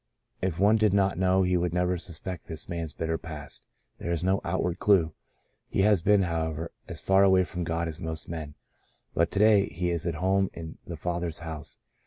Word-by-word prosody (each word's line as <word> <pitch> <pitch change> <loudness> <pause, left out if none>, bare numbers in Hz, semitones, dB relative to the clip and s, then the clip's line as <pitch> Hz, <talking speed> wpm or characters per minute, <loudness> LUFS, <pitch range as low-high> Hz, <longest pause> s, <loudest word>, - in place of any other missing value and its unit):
If 90 -3 -1
one 105 +4 +5
did 105 -2 +3
not 95 -2 +2
know 95 0 +3
he 90 0 +2
would 90 0 -1
never 90 0 +2
suspect 85 0 -6
this 80 -1 -5
man's 85 -2 -4
bitter 80 0 -2
past. 75 -3 -8 0.3
There - - -4
is 85 0 -1
no 95 +2 +2
outward 90 0 -1
clue. 85 -6 +4 0.6
He - - +1
has 105 -3 +4
been, 100 +2 +4
however, 80 -1 -2 0.2
as - - -4
far 95 0 +4
away 95 -1 +5
from 90 0 -4
God 85 +1 -1
as 80 -2 -6
most 80 -1 -4
men, 80 -3 -6 0.6
but 85 0 +2
to - - -5
day 105 -1 +5
he 90 +2 -2
is 85 0 -2
at 85 - -1
home 95 +3 +2
in 80 -1 -8
the 85 - -5
Father's 85 0 -2
house. 80 -2 -6
85 Hz, 205 wpm, -28 LUFS, 80-95 Hz, 0.6 s, one